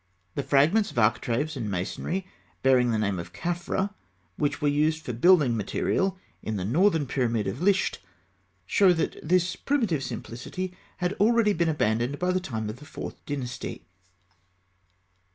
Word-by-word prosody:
The - - -1
fragments 150 +11 +3
of - - -12
architraves 120 +6 +1
and 115 -5 -3
masonry 100 - -3 0.4
bearing 130 -2 +4
the 115 - +1
name 100 -4 0
of 85 - -8
Khafra, 175 +3 -2 0.4
which 145 +4 -1
were 150 - +1
used 155 +2 +1
for 125 - -3
building 145 -1 +5
material 190 - 0 0.2
in 110 - -3
the 95 -2 -2
northern 160 - +3
pyramid 120 -4 0
of 95 +10 -4
Lisht, 195 +1 +2 0.7
show 195 -4 +5
that 165 - -1
this 180 +2 +2
primitive 225 - 0
simplicity 155 +10 -5 0.2
had 180 +1 -1
already 220 0 +4
been 170 -2 +1
abandoned 120 -2 0
by 180 +3 +1
the 185 - +1
time 110 -11 -4
of 110 +3 -5
the 150 - -13
Fourth - - -8
Dynasty. 125 - -5
150 Hz, 150 wpm, -27 LUFS, 120-180 Hz, 0.7 s, building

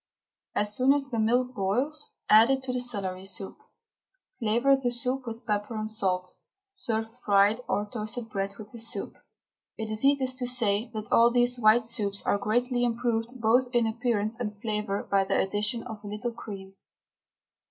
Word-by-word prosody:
As 210 0 +2
soon 260 +4 +4
as 280 -1 -2
the 230 -3 -2
milk 245 +3 +2
boils 255 +11 -1 0.2
add 220 +3 +7
it 265 -1 +1
to 255 -1 -2
the 250 - 0
celery 195 -6 -2
pulp, 195 -3 -8 0.8
flavour 240 +4 +3
the 265 -2 -1
soup 250 +2 -1
with 230 +1 -7
pepper 210 0 -2
and 215 0 -3
salt; 185 -4 -1 0.4
serve 225 - -1
fried 205 +1 +3
or 205 - 0
toasted 220 +2 -5
bread 195 -1 -3
with 210 -1 -10
the 235 - -9
soup. 230 - -4 0.6
It 220 -1 -4
is 215 +2 0
needless 275 -2 +3
to 250 - -1
say 230 -3 +2
that 215 0 -5
all 235 +1 +6
these 245 0 +2
white 225 +1 +5
soups 205 -4 -2
are 200 - +1
greatly 245 +4 0
improved 235 +1 -1
both 235 +3 +3
in 240 -1 +4
appearance 225 -1 -1
and 210 -4 -4
flavour 210 -2 -2
by 195 -1 +2
the 190 - 0
addition 210 +4 0
of 215 -1 -9
a - - -8
little 210 +4 -3
cream. 195 -4 -9
225 Hz, 175 wpm, -27 LUFS, 210-245 Hz, 0.8 s, add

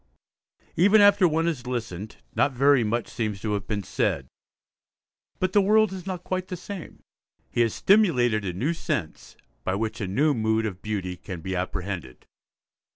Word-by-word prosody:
Even 200 +6 +5
after 205 -2 +6
one 165 +1 +1
has 145 -8 -2
listened, 110 -5 -4 0.2
not 140 - +2
very 135 0 +4
much 115 +2 -1
seems 105 -4 -3
to 105 0 -2
have 100 -1 -3
been 105 -1 -2
said; 70 -6 -1 1.1
but 185 0 -1
the 205 - +6
world 215 0 +4
is 185 0 -8
not 180 -2 -4
quite 185 0 -3
the 180 - -5
same. 185 0 -9 0.5
He 120 - +1
has 115 -2 +1
stimulated 125 - +3
a 95 - -2
new 135 - -1
sense, 80 - -4 0.3
by 95 - -1
which 110 +2 -3
a 95 - -2
new 145 +11 +2
mood 110 -2 +1
of 95 -4 -5
beauty 95 -4 -3
can 90 -1 -8
be 95 +3 -3
apprehended. 90 -6 -4
120 Hz, 170 wpm, -25 LUFS, -, 1.1 s, after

